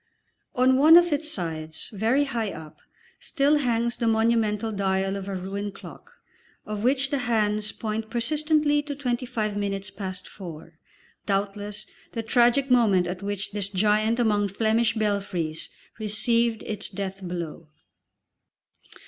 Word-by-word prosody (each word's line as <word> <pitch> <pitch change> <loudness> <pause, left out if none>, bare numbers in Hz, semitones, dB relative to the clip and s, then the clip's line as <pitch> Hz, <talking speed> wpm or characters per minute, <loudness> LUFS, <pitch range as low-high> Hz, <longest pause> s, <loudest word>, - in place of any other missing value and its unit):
On 255 +1 +4
one 315 +5 +8
of 345 -2 +4
its 305 +2 -1
sides, 160 - -4
very 225 +8 +2
high 230 -7 -2
up, 155 -1 -10 0.4
still 290 0 +2
hangs 235 -3 0
the 235 -1 0
monumental 225 -1 +2
dial 195 -1 0
of 195 -1 -5
a 195 - -3
ruined 195 +2 -4
clock, 475 - -12 0.5
of 210 0 -4
which 270 +2 +2
the 285 - +1
hands 215 -3 +1
point 220 0 -4
persistently 295 +5 +2
to 290 -1 -6
twenty 250 -2 -2
five 215 -3 -2
minutes 200 -1 -2
past 190 -2 -6
four 165 -3 -10 0.5
doubtless 205 +1 -2 0.3
the 230 - -3
tragic 245 +4 +3
moment 210 -7 +4
at 180 +1 -4
which 200 0 -3
this 200 -2 -2
giant 210 +3 +2
among 210 -4 +2
Flemish 225 +3 +1
belfries 200 -7 -2 0.3
received 225 +2 +1
its 210 -1 -4
death 195 -1 -5
blow. 170 -3 -5
215 Hz, 140 wpm, -25 LUFS, 195-240 Hz, 0.5 s, one